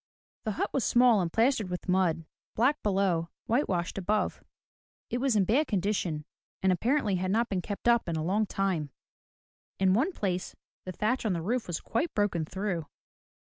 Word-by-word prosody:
The 215 - -1
hut - - -2
was 270 - +1
small 240 -4 +5
and 170 -2 -2
plastered 225 -2 +2
with 180 +1 -5
mud, 180 -3 +1 0.3
black 265 +7 +2
below, 190 -5 +1 0.2
whitewashed 195 -8 0
above. 210 +3 -1 0.7
It 245 - 0
was 260 -3 +1
in 205 - +4
bad 270 - +2
condition, 185 -6 -1 0.4
and 190 - +4
apparently 215 - +1
had 185 +1 -2
not 230 +4 +1
been 190 -3 -1
kept 205 +4 -5
up 235 -6 +3
in 165 - -1
a 155 - -1
long 205 +5 +1
time. 185 -8 -1 0.9
In 190 -1 +3
one 270 - +2
place 185 - -3 0.3
the 185 - -4
thatch 215 +8 0
on 215 -4 +1
the 170 - -2
roof 235 +5 -1
was 175 -3 -2
quite 275 +9 -2
broken 195 -6 +1
through. 185 -2 -3
195 Hz, 180 wpm, -29 LUFS, 180-230 Hz, 0.9 s, small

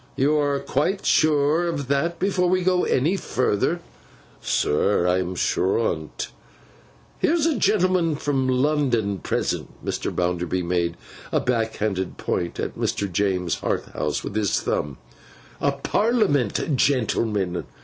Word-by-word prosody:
You 145 +2 +2
are 145 -1 +1
quite 185 +11 -1
sure 155 +2 +3
of 145 -6 -3
that 140 +5 0
before 185 -2 +1
we 185 0 +2
go 180 0 +2
any 155 +9 +2
further.' 155 - 0 0.6
'Sir, 90 +4 +1
I 90 +1 +3
am 90 0 -3
sure 95 +2 +1
on 80 -9 -1
't.' - - -4 0.9
'Here's 325 -1 +2
a 325 -3 +2
gentleman 185 - +2
from 135 -3 0
London 125 -7 +1
present,' - - -3
Mr. - - -2
Bounderby 90 0 -1
made 85 -1 -1 0.3
a - - +2
backhanded 110 -5 -1
point 85 -1 -2
at - - -3
Mr. 100 -2 -2
James 90 -2 0
Harthouse - - -2
with - - -6
his 105 -2 +1
thumb, 75 -2 -2 0.6
'a 140 - +3
Parliament 150 - +1
gentleman. 110 -8 0
130 Hz, 130 wpm, -23 LUFS, -, 0.9 s, sure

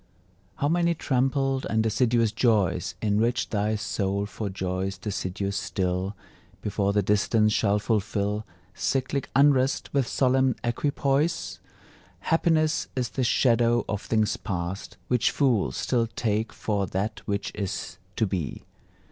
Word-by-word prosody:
How 145 - 0
many 170 +1 +2
trampled 135 -1 0
and 110 0 +2
deciduous 115 0 +2
joys 110 -5 +1
Enrich 110 +3 +1
thy 105 0 +1
soul 100 -1 -1
for 105 0 -5
joys 95 0 -3
deciduous 100 0 -3
still, 95 +2 -2 0.5
Before 100 -1 0
the 105 0 +2
distance 105 +2 +2
shall 105 -2 +2
fulfil 105 -1 -1 0.3
Cyclic 135 +3 -1
unrest 135 -1 +3
with 135 -4 +2
solemn 130 -1 +2
equipoise! 140 +6 0 0.6
Happiness 160 +2 +2
is 125 -2 -1
the 130 - -2
shadow 120 -1 +3
of 105 -1 -2
things 110 -2 +1
past, 90 +1 -4
Which 125 -1 +2
fools 125 -8 +1
still 120 -2 +1
take 110 -1 -1
for 100 -3 -1
that 100 +5 -3
which 100 -1 -2
is 100 0 -4 0.2
to 110 - +2
be! 90 -7 -3
110 Hz, 125 wpm, -26 LUFS, 100-130 Hz, 0.6 s, unrest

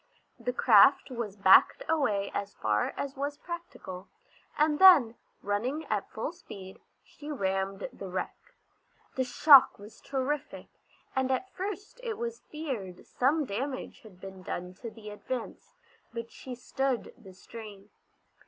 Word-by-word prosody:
The 250 - -2
craft 250 +3 +5
was 230 -5 -4
backed 195 -2 +6
away 250 -11 +1
as 200 0 -4
far 105 -1 0
as 280 -1 -4
was 285 +1 -3
practical, 330 - -8 0.5
and 300 0 +2
then, 320 -12 +8 0.3
running 245 +10 -2
at - - -1
full - - -4
speed, 195 - -11 0.2
she 295 0 -12
rammed 195 -6 -2
the 195 - -8
wreck. 185 0 -3 0.8
The 260 - 0
shock 275 +2 +7
was 205 +2 -14
terrific, 275 +2 -3 0.5
and 265 0 +1
at 325 +9 -2
first 405 +4 -6
it 460 -3 -4
was 470 0 -4
feared 245 - -6
some 290 +4 +1
damage 260 +4 -4
had 210 -7 -16
been 190 0 -10
done 180 0 -5
to 235 - -5
the 215 -1 -10
Advance, 240 +3 -6 0.4
but 230 -1 -6
she 255 -1 -8
stood 260 +1 -2
the 190 -1 -15
strain. 210 -1 -11
250 Hz, 140 wpm, -29 LUFS, 200-290 Hz, 0.8 s, then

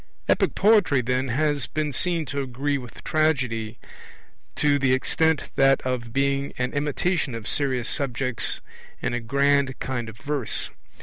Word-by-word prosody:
Epic - - +2
poetry, 195 - +4
then, 125 +2 0
has 145 +3 +1
been 150 -2 -2
seen 170 +3 +1
to 140 0 -3
agree 135 +2 -2
with 125 -2 -11
Tragedy 130 -9 0 0.8
to 145 -1 +2
this 135 -1 +3
extent, 160 +3 +1
that 135 0 +5
of 125 -2 -3
being 140 +2 0
an 125 0 -2
imitation 150 0 0
of 115 -2 -6
serious 130 -4 0
subjects 130 -3 0 0.4
in - - 0
a 120 - 0
grand 140 +2 +2
kind 120 -4 -3
of 110 - -12
verse. 140 -4 -2
135 Hz, 145 wpm, -24 LUFS, 125-145 Hz, 0.8 s, that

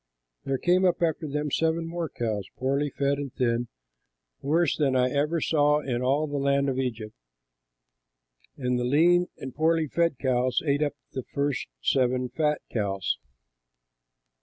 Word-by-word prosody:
There 135 -1 0
came 180 +6 +2
up 175 -1 +2
after 160 -1 0
them 150 0 -2
seven 165 +2 +1
more 165 -1 -3
cows, 110 -4 -3
poorly 140 +3 0
fed 140 0 0
and 140 -2 -4
thin, 120 -1 0 0.7
worse 160 +2 +2
than 140 -4 +1
I 125 0 +2
ever 150 +4 +1
saw 150 -1 +3
in 125 -4 -2
all 140 +4 +2
the 145 -1 -3
land 140 0 +2
of 130 -1 -1
Egypt; 115 -4 -3 1.4
and 125 -2 0
the - - -1
lean 170 +7 +4
and 130 -2 -7
poorly 160 0 +2
fed 170 -1 +1
cows 130 -2 +1
ate 145 0 +1
up 145 -1 0 0.2
the 130 - -4
first 140 +1 -2 0.2
seven 125 -1 +1
fat 150 0 0
cows. 100 -4 -1
140 Hz, 155 wpm, -27 LUFS, 125-155 Hz, 1.4 s, lean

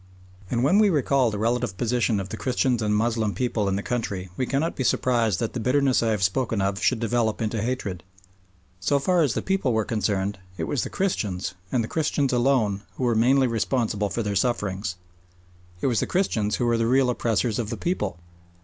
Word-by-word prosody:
And 120 0 0
when 180 +10 +4
we 215 -1 +5
recall 140 -6 +2
the 105 - -4
relative 115 -3 -1
position 120 -2 +1
of 95 0 -5
the - - -4
Christians 125 0 0
and 105 -1 0
the 105 - +3
Moslem 110 -3 0
people 110 -3 0
in 95 - 0
the 100 - -3
country 100 -6 -3
we 130 - -1
cannot 145 +5 0
be 130 - -2
surprised 115 -6 +1
that 115 - -2
the 125 - -3
bitterness 130 +2 +2
I 115 - +1
have 105 -3 0
spoken 110 +3 0
of 100 +1 -1
should 125 -1 +2
develop 115 -1 0
into 110 -1 -1
hatred. 105 -6 -3 0.8
So 120 +10 +2
far 175 +5 +2
as 140 -8 +1
the - - -2
people 190 -10 0
were 110 -1 +1
concerned, 100 -3 -1 0.2
it - - -3
was 140 - -1
the - - -4
Christians, 105 - -2 0.2
and 120 -3 +1
the - - -4
Christians 145 -3 0
alone, 120 -6 +2
who - - -4
were 120 -1 +2
mainly 130 +4 +4
responsible 115 -3 0
for 115 - -2
their 105 -1 -2
sufferings. 100 -4 -1 0.9
It - - -1
was 120 -5 +2
the - - -1
Christians 110 - 0
who 120 - -1
were 120 -1 +2
the 115 - +1
real 130 0 +3
oppressors 115 -1 0
of 110 -3 -2
the 115 - -4
people. 105 - -2
115 Hz, 210 wpm, -25 LUFS, 105-130 Hz, 0.9 s, we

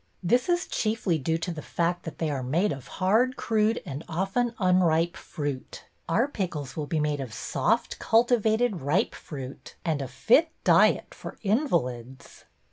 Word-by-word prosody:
^ - - -44 0.2
This 245 - +2
is 350 0 +2
chiefly 215 -7 0
due 160 +4 0
to 165 +2 -3
the 160 -2 -6
fact 175 +2 -1
that 165 - -7
they 160 -2 -1
are 135 -2 -2
made 160 +11 +1
of 135 -3 -6
hard 225 +7 +3
crude 220 0 +1
and 140 +3 -6
of 190 +4 -2
ten 245 -1 +2
unr 185 -4 +3
ipe 165 +2 +1
f - - -16
ruit.^ 145 -4 -4 0.3
Our 225 +11 +3
pickles 165 - -4
will 150 -2 -3
be 160 - 0
made 150 -1 0
of 130 -4 -5
soft, 230 - 0
cultivated, 225 -3 +2
ripe 155 - +1
fruit 135 -3 -9
and 155 -4 0
a 135 - -3
fit 225 - +3
diet - - +4
for - - -9
invalids. 135 - -2
175 Hz, 180 wpm, -27 LUFS, 145-220 Hz, 0.3 s, diet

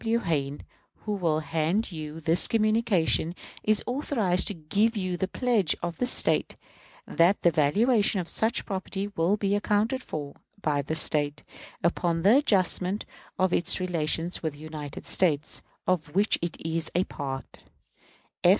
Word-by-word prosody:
W. 230 0 +2
Hayne, 145 -9 -2 0.4
who 210 - -1
will 165 -6 0
hand 165 +8 -1
you 155 -1 -7
this 165 +2 +4
communication, 215 -7 +2 0.3
is 215 -1 +2
authorized 235 -9 0
to 205 - 0
give 205 +8 0
you 185 -2 -2
the 190 +2 -1
pledge 225 -6 +1
of 170 -2 -3
the 250 - +1
State - - +1 0.5
that 175 +4 +2
the 170 - +5
valuation 205 - +3
of 175 - -4
such 220 +5 0
property 195 0 -4
will 175 +6 +2
be 200 -1 0
accounted 210 +5 0
for, 145 - -6 0.3
by 150 -6 0
this 155 +3 -2
State, 145 -1 -1 0.4
upon 170 0 0
the 210 +7 +6
adjustment 195 - +1 0.3
of 185 -2 +1
its 175 - +3
relations 170 -1 -1
with 160 -3 -2
the - - -14
United 155 -2 -8
States, 150 -6 +1 0.2
of 165 -4 -1
which 200 +2 +3
it 170 -1 -3
was 165 0 0
a 180 - +3
part. 135 -6 -6
180 Hz, 150 wpm, -27 LUFS, 155-210 Hz, 0.5 s, the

